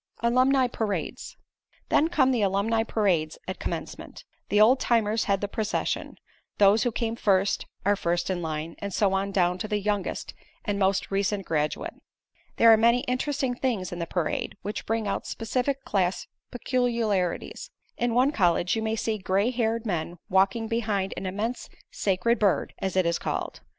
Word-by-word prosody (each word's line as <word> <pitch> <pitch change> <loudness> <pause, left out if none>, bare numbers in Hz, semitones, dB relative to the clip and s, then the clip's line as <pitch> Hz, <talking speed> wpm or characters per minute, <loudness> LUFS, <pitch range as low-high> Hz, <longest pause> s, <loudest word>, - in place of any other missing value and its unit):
ALUMNI 255 +2 +4
PARADES 215 -4 -4 0.5
Then 315 - +4
come 270 -6 +3
the 245 -4 +1
alumni 200 +3 +1
parades 185 -9 0
at 185 - -5
Commencement. - - -6 0.3
The 205 - +3
old 240 +5 +6
timers 225 -2 +1
head 195 -1 +1
the 205 - -1
procession; 215 +1 -2 0.4
those 205 +2 +5
who 245 - +1
came 230 0 -2
first, 195 -3 +1 0.2
are 205 +1 +4
first 175 -1 -1
in 180 -1 -2
line, 160 0 -4
and 200 - -4
so 195 0 +2
on 195 +1 0
down 180 -2 +1
to 215 - -3
the 210 -1 0
youngest 205 -1 -2 0.3
and 205 -1 -1
most 195 0 +1
recent 195 0 0
graduate. 150 -1 -1 0.6
There 230 0 +8
are - - +6
many 235 +2 +4
interesting 260 +1 -1
things 240 -7 -2
in 175 - -5
the 170 - -3
parade, 175 +3 -2
which 205 - -5
bring 225 -1 -1
out 200 - -2
specific 255 +4 -2
class 190 -2 0 0.2
peculiarities. 235 -7 -1 0.3
In 240 -1 -1
one 255 +3 +4
college 180 - +2
you 225 - -1
may 220 0 -1
see 220 -1 -2
gray 195 +5 +1
haired 230 -1 -1
men 175 -3 -2
walking 195 +4 +2
behind 215 -4 -1
an 190 - -4
immense 215 +6 -3 0.2
Sacred 205 +5 +1
Bird, 200 -3 +1
as 190 -1 -2
it 185 -1 +3
is 170 0 +1
called. - - -4
210 Hz, 170 wpm, -26 LUFS, 190-230 Hz, 0.6 s, There